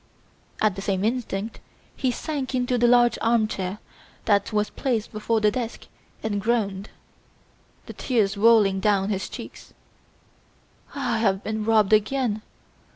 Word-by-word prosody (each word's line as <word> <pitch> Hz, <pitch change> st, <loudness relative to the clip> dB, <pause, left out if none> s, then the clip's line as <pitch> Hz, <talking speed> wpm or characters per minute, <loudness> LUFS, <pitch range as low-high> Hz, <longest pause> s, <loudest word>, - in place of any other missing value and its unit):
At 215 Hz, -3 st, +2 dB
the 195 Hz, -, -5 dB
same 195 Hz, -1 st, -1 dB
instant 225 Hz, -3 st, -2 dB, 0.4 s
he 260 Hz, -, 0 dB
sank 270 Hz, +1 st, -3 dB
into 245 Hz, -1 st, 0 dB
the 240 Hz, -, +4 dB
large 240 Hz, 0 st, +4 dB
armchair 215 Hz, -4 st, 0 dB, 0.5 s
that 205 Hz, 0 st, +2 dB
was 210 Hz, -1 st, 0 dB
placed 235 Hz, -6 st, -2 dB
before 220 Hz, +1 st, -1 dB
the 210 Hz, 0 st, +4 dB
desk 235 Hz, 0 st, -5 dB, 0.4 s
and 205 Hz, -2 st, -1 dB
groaned, 205 Hz, -3 st, -1 dB, 1.0 s
the -, -, -9 dB
tears 215 Hz, -6 st, 0 dB
rolling 205 Hz, -2 st, +4 dB
down 195 Hz, 0 st, +1 dB
his 195 Hz, -2 st, -2 dB
cheeks, -, -, -10 dB, 1.2 s
"I 245 Hz, -5 st, -1 dB
have 195 Hz, -3 st, +1 dB
been 220 Hz, 0 st, -3 dB
robbed 220 Hz, -2 st, +3 dB
again! 215 Hz, 0 st, +1 dB
220 Hz, 135 wpm, -24 LUFS, 200-240 Hz, 1.2 s, the